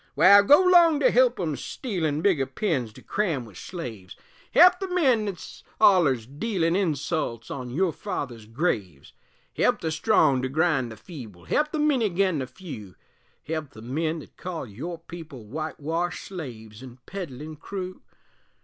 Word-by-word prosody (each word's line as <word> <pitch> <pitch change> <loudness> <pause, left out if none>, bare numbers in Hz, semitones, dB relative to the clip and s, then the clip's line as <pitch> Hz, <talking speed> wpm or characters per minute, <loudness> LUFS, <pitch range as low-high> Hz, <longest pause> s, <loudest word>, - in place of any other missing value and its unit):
Wal, 200 +2 +8
go 290 - +6
'long 345 -4 +6
to 260 - +5
help 250 0 +4
'em 160 -5 -1
stealin' 160 - -3
Bigger 155 -10 +2
pens 130 - -1
to - - -14
cram 165 - -1
with 105 -5 -15
slaves, 110 - -7 0.4
Help 360 +3 +7
the 385 - -3
men 265 - +2
thet's 190 -4 -7 0.2
ollers 145 - +5
dealin' 165 - -1
Insults 155 - -1
on 130 -3 -5
your 170 +6 0
fathers' 120 -6 -5
graves; 105 - -2 0.4
Help - - +2
the 160 - -2
strong 155 - +3
to 130 - -2
grind 145 -5 +1
the 110 - -10
feeble, 110 - -11
Help 300 0 +1
the - - -2
many 295 -6 +2
agin 185 -4 +1
the 130 - -3
few, 125 - -10 0.5
Help 155 -3 -4
the 110 - -11
men 155 +6 -1
that 155 - -12
call 175 -5 -5
your 135 - -6
people 160 -7 -10
Witewashed 160 +6 -3
slaves 120 - -8
an' 125 -2 -11
peddlin' 155 -5 -7
crew? 185 +3 -6
160 Hz, 160 wpm, -26 LUFS, 130-195 Hz, 0.5 s, Wal